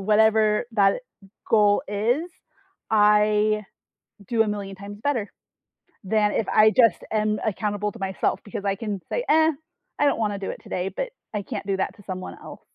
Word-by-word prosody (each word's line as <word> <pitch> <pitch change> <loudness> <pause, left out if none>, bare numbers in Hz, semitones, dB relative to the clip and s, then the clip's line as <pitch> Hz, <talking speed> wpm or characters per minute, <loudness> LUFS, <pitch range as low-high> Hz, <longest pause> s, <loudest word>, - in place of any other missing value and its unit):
whatever, 215 +1 +3
that 200 -2 +3 0.5
goal 210 -2 +4
is, 240 - 0 0.6
I, 210 0 +3 0.6
do 225 0 +3
1,000,000 205 -2 -4
times 200 +2 -9
better, 240 -7 -1 0.7
than 210 +1 +1
if 225 - -1
I 215 0 +6
just 230 -5 +4
am 215 -1 +1
accountable 210 0 -1
to - - -13
myself 190 0 -1
because 200 -1 -6
I 195 -1 +1
can 205 -2 -4
say, - - -2
"Eh, 315 +1 +5 0.5
I - - +4
don't 285 - +2
wanna 205 -3 -1
do 195 - -3
it - - -7
today," 180 +1 -3
but, 485 - -4 0.2
I 205 - -1
can't 205 -1 -6
do 195 -1 0
that - - -1
to 205 - -16
someone 185 -1 -6
else. - - -10
210 Hz, 170 wpm, -24 LUFS, 200-220 Hz, 0.7 s, I